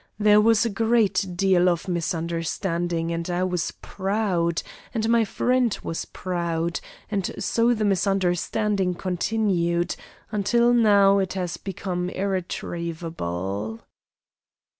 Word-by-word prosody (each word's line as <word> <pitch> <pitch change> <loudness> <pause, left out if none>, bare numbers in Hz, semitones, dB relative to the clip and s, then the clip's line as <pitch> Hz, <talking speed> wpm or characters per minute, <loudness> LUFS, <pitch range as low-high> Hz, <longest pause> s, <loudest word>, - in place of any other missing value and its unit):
There 210 0 +5
was 225 +1 +4
a - - +1
great 215 -3 +2
deal 185 -1 +4
of 175 +2 -1
misunderstanding; 170 0 -2
and 170 +1 -3
I 175 +1 0
was 180 -2 -1
proud, 190 -4 -1 0.3
and 220 -1 0
my 230 0 +4
friend 245 +2 +1
was 165 - -3
proud, 170 -2 -2 0.3
and 195 -4 -1
so 235 +1 +2
the 215 -1 0
misunderstanding 195 0 +1
continued, 175 -2 0 0.4
until 235 +4 +3
now 200 -4 +5
it 190 -2 -1
has 180 -3 -3
become 180 -2 -3
irretrievable." 165 - -3
185 Hz, 110 wpm, -24 LUFS, 170-210 Hz, 0.4 s, There